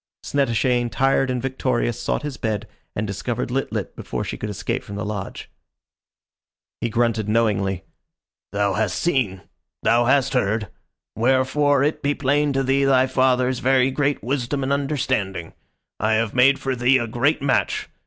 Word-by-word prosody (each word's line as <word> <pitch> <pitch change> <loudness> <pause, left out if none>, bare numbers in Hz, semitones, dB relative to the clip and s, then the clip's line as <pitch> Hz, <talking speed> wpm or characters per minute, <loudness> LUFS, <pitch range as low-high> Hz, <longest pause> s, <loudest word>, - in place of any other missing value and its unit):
Snettishane, 125 -2 +1
tired 135 +3 +2
and 125 -1 -1
victorious, 125 -3 -1
sought - - -1
his 145 -3 -4
bed, 110 -5 -3 0.3
and 105 - -1
discovered 105 +5 -3
Lit 135 +2 -1
lit - - -4
before - - -4
she - - -4
could 105 - -5
escape 105 - -3
from 100 - -8
the 105 - -3
lodge. 100 -2 -5 1.3
He 120 - -1
grunted 115 -2 0
knowingly: 100 -4 +1 0.7
"Thou 100 -1 +1
hast 105 -3 0
seen. 125 - 0 0.4
Thou 120 +1 +4
has 130 +1 +3
heard. 110 -5 0 0.5
Wherefore 130 +3 +2
it 150 +2 0
be 145 +1 0
plain 145 +2 +1
to 135 0 +1
thee 135 +1 +2
thy 130 -1 +4
father's 130 -1 +2
very 130 0 +3
great 145 +1 0
wisdom 135 +1 -1
and 135 +1 0
understanding. 130 - -1 0.5
I 110 +1 +2
have 110 -1 +1
made 135 +2 +5
for 135 -1 -2
thee 125 +2 +4
a 120 - -1
great 120 +6 0
match. 135 -2 +1
125 Hz, 160 wpm, -22 LUFS, 110-135 Hz, 1.3 s, made